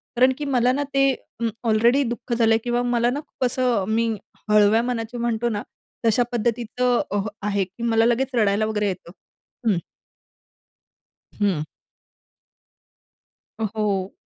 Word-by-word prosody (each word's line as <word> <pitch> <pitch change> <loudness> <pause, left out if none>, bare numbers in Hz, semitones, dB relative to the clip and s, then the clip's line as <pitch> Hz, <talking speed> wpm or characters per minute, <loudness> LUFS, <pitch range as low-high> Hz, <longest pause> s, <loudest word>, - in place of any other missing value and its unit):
कारणकी 260 +4 +3
मला 250 -2 +2
ना 285 - 0
ते 275 0 +4 0.3
अ, 235 - -1 0.2
ऑलरेडी 235 +5 +4
दुःख 240 0 -4
झालं 225 -1 +4
किंवा 240 0 0
मला 240 -1 +2
ना 280 +4 -2
खूप 255 - -3
असं 245 -5 +1
मी 230 +1 +1 0.4
हळव्या 210 +1 +5
मनाची 240 -1 -3
म्हणतो 235 0 0
ना 205 -2 -2 0.4
तशा 225 +2 +4
पद्धतीचं 240 +1 0
अ, 205 - +1 0.3
आहे. 200 -1 +1
की 195 +6 -9
मला 225 -1 +3
लगेच 250 +2 +1
रडायला 215 -1 +2
वगैरे 210 -1 0
येतं. 180 -2 -5 0.6
हं. 195 -5 +3 1.6
हं. 190 -7 +1 2.0
अ, - - -1
हो. 200 -3 -1
230 Hz, 135 wpm, -23 LUFS, 210-245 Hz, 2.0 s, हळव्या